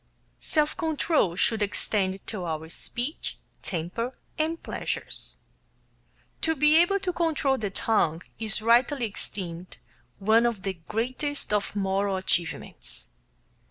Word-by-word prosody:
Self 300 -3 +1
control 315 - +1
should 220 +3 +2
extend 195 -2 +1
to 205 -5 -4
our 160 -1 -3
speech, 245 - -3 0.2
temper, 190 +9 -3 0.2
and 325 +1 -1
pleasures. - - -3 1.0
To 320 0 +2
be 300 +2 +5
able 350 +4 +4
to 365 -2 -1
control 305 -6 +1
the 210 -2 -1
tongue 180 -5 +1 0.2
is 215 -1 +2
rightly 240 +3 +4
esteemed 180 -4 -4 0.4
one 220 +4 +4
of 220 -5 -3
the 195 - -1
greatest 255 +4 -2
of 205 0 0
moral 195 0 +1
achievements. 175 -3 -2
220 Hz, 120 wpm, -27 LUFS, 190-290 Hz, 1.0 s, be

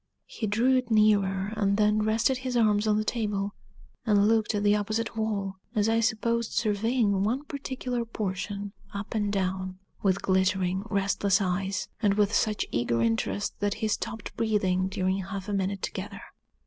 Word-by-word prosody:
He 220 - -4
drew 240 +6 +3
it 255 -2 -2
nearer, 205 -2 +3
and 200 -1 +1
then 210 0 +3
rested 225 +5 +2
his 255 -1 -2
arms 215 -2 +3
on 210 0 +3
the 215 - +1
table, 205 -3 -1 0.5
and 205 -1 +4
looked 220 -1 +2
at 205 - 0
the 205 0 +4
opposite 215 +2 -2
wall, 200 -3 -2 0.2
as 210 0 +2
I 225 0 +3
supposed 230 +1 0
surveying 215 -1 +1
one 245 +7 0
particular 260 -4 -3
portion, 205 -2 -4 0.2
up 200 +1 -5
and 205 -2 0
down, 185 -1 -2 0.2
with 195 -1 +1
glittering, 190 0 +1
restless 200 0 +2
eyes, 190 +1 -1
and 205 -3 +3
with 210 0 +2
such 215 -2 +1
eager 115 0 0
interest 115 - -1
that 205 0 0
he 220 0 -1
stopped 220 +1 -3
breathing 190 -4 +1
during 190 0 0
half 195 +1 -6
a 205 - -2
minute 195 0 -1
together. - - -5
205 Hz, 165 wpm, -27 LUFS, 195-220 Hz, 0.5 s, and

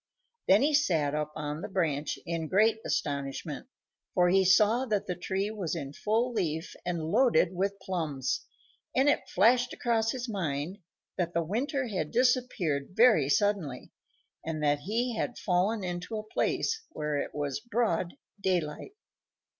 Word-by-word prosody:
Then 200 +6 +6
he 300 +2 +2
sat 165 - +2
up 150 0 -2
on 150 0 -4
the - - -4
branch 155 -6 -1
in 165 -1 -2
great 215 +5 +3
astonishment, 140 - -3 0.5
for 180 -1 +4
he 190 +1 +4
saw 215 +7 +4
that 210 -3 0
the 180 - -2
tree 190 +4 -2
was 190 -6 -3
in 140 -4 -5
full 225 +8 0
leaf 160 -6 -2
and 165 -2 -2
loaded 220 -7 +4
with 195 +2 -1
plums, 160 -9 -2 0.5
and 265 +2 +4
it 290 - +2
flashed 245 +6 +3
across 225 -2 +1
his 255 -1 -4
mind 175 -3 -3 0.4
that 175 -1 -1
the 170 - +2
winter 255 - -1
had 185 -9 -2
disappeared 235 - +1
very 220 - +5
suddenly, 185 -9 0 0.5
and 155 -1 -3
that 145 0 +2
he 230 +9 -1
had 245 - -2
fallen 195 +3 +1
into 180 +4 -4
a 215 - -4
place 445 - -1
where 150 - -2
it - - -4
was 145 +2 -2
broad 220 -7 -1 0.3
daylight. 180 - -1
185 Hz, 155 wpm, -29 LUFS, 155-225 Hz, 0.5 s, Then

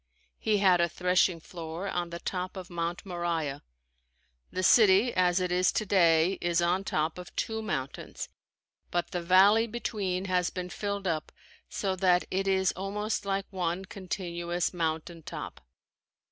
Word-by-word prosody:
He 215 -1 +2
had 185 -3 +4
a 170 - +2
threshing 180 0 +2
floor 165 +2 -6
on 175 -2 -2
the 170 - -5
top 185 +2 -4
of 185 -1 -8
Mount 170 +2 -3
Moriah. 170 -6 -2 0.9
The 185 - -3
city 215 +3 +6
as 180 0 +3
it 180 -1 -1
is 180 +1 +3
today 180 -3 +3
is 175 -1 +1
on 175 +3 +1
top 160 -1 -1
of 180 - -10
two 220 0 -2
mountains, 140 -11 -4 0.6
but 175 -1 -1
the 175 - -2
valley 195 +6 +5
between 205 -5 -2
has 180 -2 +1
been 180 -1 -5
filled 200 -1 -3
up 160 -4 -2 0.4
so 195 -2 -1
that 180 -1 +3
it 195 +1 0
is 190 -1 +3
almost 205 +2 -3
like 195 0 0
one 180 0 -2
continuous 175 -2 -3
mountain 165 0 -2
top. - - -7
180 Hz, 150 wpm, -29 LUFS, 170-195 Hz, 0.9 s, city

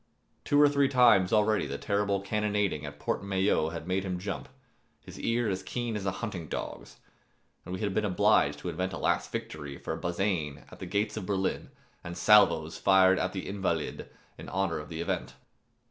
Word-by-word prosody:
Two 145 - +2
or 145 - +8
three 140 -1 +2
times 120 -8 +5
already 110 0 +2
the - - -4
terrible 100 -1 0
cannonading 105 -6 -1
at 70 0 -9
the - - -20
Porte - - -1
Maillot 95 -5 +1
had 85 0 -6
made 95 +1 0
him 90 -2 -3
jump, 100 +5 -5 0.6
his - - -10
ear 115 0 0
as 95 -2 -1
keen 120 +3 -3
as 100 -2 -3
a - - +2
hunting 90 -7 -6
dog's, - - -6 0.7
and 90 - -8
we 95 - -7
had 100 -2 -1
been 110 - +1
obliged 75 -7 +3
to 90 - -5
invent 90 +3 -3
a - - -4
last - - 0
victory 75 -3 -6
for 80 - -4
Bazaine 85 -4 -2
at - - -12
the 95 - -6
gates 105 +3 -1
of 95 -4 -5
Berlin 95 -2 -1 0.3
and 85 0 -7
salvos 85 -7 +4
fired 95 -1 +5
at 95 - -1
the 95 -1 -5
Invalides[273 95 -6 -2
1] - - -10 0.3
in - - -8
honor 95 -4 -1
of 75 - -9
the 80 -1 -5
event. 85 - -3
95 Hz, 200 wpm, -29 LUFS, 85-105 Hz, 0.7 s, or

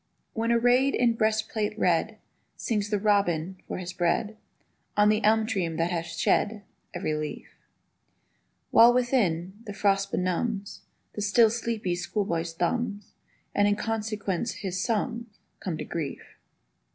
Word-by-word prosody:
When 230 +1 0
arrayed 245 +3 +3
in 240 -1 +3
breastplate 215 -1 0
red 200 +4 +1 0.4
Sings 210 -4 -1
the 210 - +1
robin, 190 -4 +1
for - - -4
his 180 0 -6
bread, 185 +4 0 0.6
On 210 0 +5
the 215 +1 +2
elmtree 215 -4 +2
that 165 +2 0
hath 165 -2 -2
shed 200 +6 0 0.3
Every 175 -3 -2
leaf; 150 0 -4 1.2
While, 235 +2 +7
within, 205 -7 +1
the 205 - -5
frost 195 -1 +1
benumbs 195 +3 -2 0.3
The 210 - -5
still 220 +2 +4
sleepy 225 -5 -2
schoolboy's 175 -2 -2
thumbs, 205 +3 -2 0.4
And 205 0 +3
in 205 - +3
consequence 215 -1 -2
his 185 -1 -2
sums 230 -1 -2 0.2
Come 175 -4 -3
to - - -5
grief. 155 -5 -4
205 Hz, 130 wpm, -27 LUFS, 180-225 Hz, 1.2 s, While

